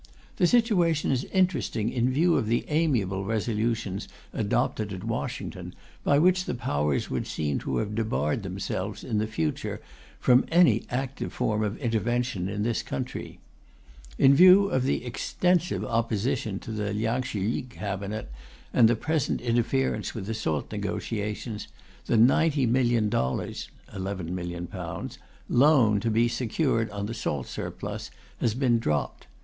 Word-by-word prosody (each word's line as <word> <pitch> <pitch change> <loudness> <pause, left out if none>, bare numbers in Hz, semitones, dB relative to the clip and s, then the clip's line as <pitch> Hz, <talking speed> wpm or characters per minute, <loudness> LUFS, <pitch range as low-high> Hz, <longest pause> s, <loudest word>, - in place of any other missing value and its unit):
The 175 - +4
situation 180 - +3
is 130 -1 0
interesting 165 - 0
in 125 0 +1
view 165 +6 +3
of 110 - +1
the 115 +2 +1
amiable 120 - +1
resolutions 110 -1 -1 0.3
adopted 110 -1 0
at 95 -1 -6
Washington, - - -4 0.3
by 140 - +4
which 185 +4 +3
the - - -2
Powers 75 - -1
would - - -2
seem 75 -3 -1
to - - -2
have 105 -1 -2
debarred 105 -9 0
themselves, - - -4
in 105 - -1
the 110 - 0
future, 80 -8 -2 0.4
from 125 0 +4
any 160 -10 +4
active 135 +2 -3
form 105 0 0
of 105 0 -2
intervention 115 -5 -1
in 105 +1 -2
this 115 0 0
country. - - -5 0.8
In 135 0 +6
view 185 +6 +7
of 130 -1 +1
the 135 - 0
extensive 175 +8 0
opposition 115 -1 -1
to - - -7
the 105 -1 -2
Liang 110 +4 0
Shih 110 -6 -4
yi 115 - 0
Cabinet 105 - -5 0.4
and 120 -3 +6
the 120 - +3
present 155 +4 0
interference 120 +3 0
with 105 -4 -4
the 110 - -3
salt 80 -10 -2
negotiations, 105 +1 -3 0.4
the - - +2
$90,000,000 120 - +2 0.3
(£11,000,000) 90 -2 -5 0.3
loan 125 -6 +5
to 115 - -1
be 115 +2 +3
secured 115 -1 0
on 100 -1 -4
the 110 - -4
salt 70 - -2
surplus - - -5 0.3
has 115 -2 +1
been 125 -3 +2
dropped. 75 -9 -2
115 Hz, 140 wpm, -27 LUFS, 105-130 Hz, 0.8 s, view